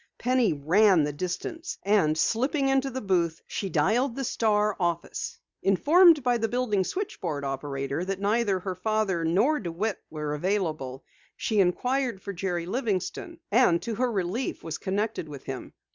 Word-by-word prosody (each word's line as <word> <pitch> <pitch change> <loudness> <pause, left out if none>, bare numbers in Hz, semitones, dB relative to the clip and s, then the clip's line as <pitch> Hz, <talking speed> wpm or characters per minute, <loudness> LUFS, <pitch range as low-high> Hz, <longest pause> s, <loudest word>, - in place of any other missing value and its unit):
Penny 250 -3 +2
ran 175 +4 +4
the 145 0 -2
distance, 185 - -4
and 190 -7 +3
slipping 270 - +1
into 270 0 +2
the 260 0 -5
booth, 175 -5 +1
she 195 - -4
dialed 225 - +1
the 275 - -3
Star 210 -4 +1
office. 170 -2 -2 0.2
Informed 310 - +5
by 245 -1 +2
the 225 - +1
building 225 -4 0
switchboard 180 - -4
operator 135 +2 -3
that 195 0 -3
neither 205 0 +1
her 185 +1 -4
father 195 -2 0
nor 205 - +2
DeWitt 190 +4 -3
was 150 -1 -4
available, 155 -7 -2 0.3
she 215 -2 0
inquired 245 +5 +1
for 200 +1 -6
Jerry 175 -2 -2
Livingston, 230 - -3
and 205 -7 +4
to 230 - -3
her 245 +3 0
relief 200 +5 -2
was 160 -1 -5
connected 195 -4 -2
with 140 -2 -9
him. 130 -1 -6
195 Hz, 155 wpm, -27 LUFS, 170-240 Hz, 0.3 s, Informed